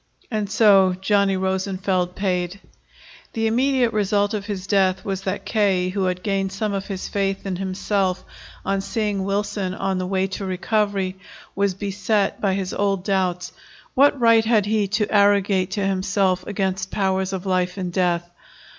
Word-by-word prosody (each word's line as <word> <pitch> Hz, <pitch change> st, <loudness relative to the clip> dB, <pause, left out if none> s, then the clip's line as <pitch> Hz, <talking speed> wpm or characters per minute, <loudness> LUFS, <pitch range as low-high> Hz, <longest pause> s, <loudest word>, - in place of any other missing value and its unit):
And 210 Hz, -3 st, -1 dB
so 195 Hz, -4 st, +5 dB
Johnny 195 Hz, 0 st, +2 dB
Rosenfeld 190 Hz, -1 st, -1 dB
paid. 180 Hz, -1 st, -1 dB, 0.7 s
The 225 Hz, 0 st, -1 dB
immediate 250 Hz, +1 st, +2 dB
result 205 Hz, 0 st, +1 dB
of 205 Hz, -1 st, -3 dB
his 195 Hz, -3 st, -4 dB
death 190 Hz, -2 st, +1 dB
was 195 Hz, -1 st, -2 dB
that 190 Hz, +1 st, -3 dB
K., 195 Hz, -4 st, +1 dB
who 190 Hz, 0 st, -1 dB
had 180 Hz, 0 st, -2 dB
gained 195 Hz, -2 st, -1 dB
some 205 Hz, +1 st, -2 dB
of 195 Hz, 0 st, -3 dB
his 195 Hz, -2 st, -4 dB
faith 195 Hz, -1 st, -2 dB
in 190 Hz, -2 st, -2 dB
himself 190 Hz, 0 st, -1 dB, 0.4 s
on 195 Hz, 0 st, 0 dB
seeing 200 Hz, 0 st, -2 dB
Wilson 200 Hz, -1 st, -2 dB
on 195 Hz, -1 st, -1 dB
the 185 Hz, -, -2 dB
way 190 Hz, 0 st, +1 dB
to 195 Hz, +1 st, -5 dB
recovery, 195 Hz, 0 st, -1 dB, 0.4 s
was 200 Hz, -1 st, +1 dB
beset 200 Hz, +1 st, -1 dB
by 195 Hz, -2 st, +1 dB
his 190 Hz, -1 st, -3 dB
old 195 Hz, -2 st, 0 dB
doubts. 185 Hz, -3 st, -1 dB, 0.4 s
What 280 Hz, +1 st, +4 dB
right 230 Hz, -1 st, +5 dB
had 220 Hz, -3 st, +3 dB
he 210 Hz, -1 st, +1 dB
to 210 Hz, +2 st, -1 dB
arrogate 200 Hz, -2 st, +3 dB
to 200 Hz, -, 0 dB
himself 190 Hz, -1 st, 0 dB
again 195 Hz, -2 st, -1 dB
powers 190 Hz, -1 st, 0 dB
of 190 Hz, 0 st, -4 dB
life 185 Hz, 0 st, 0 dB
and 180 Hz, -2 st, -4 dB
death? 175 Hz, -2 st, +1 dB
195 Hz, 165 wpm, -22 LUFS, 185-205 Hz, 0.7 s, so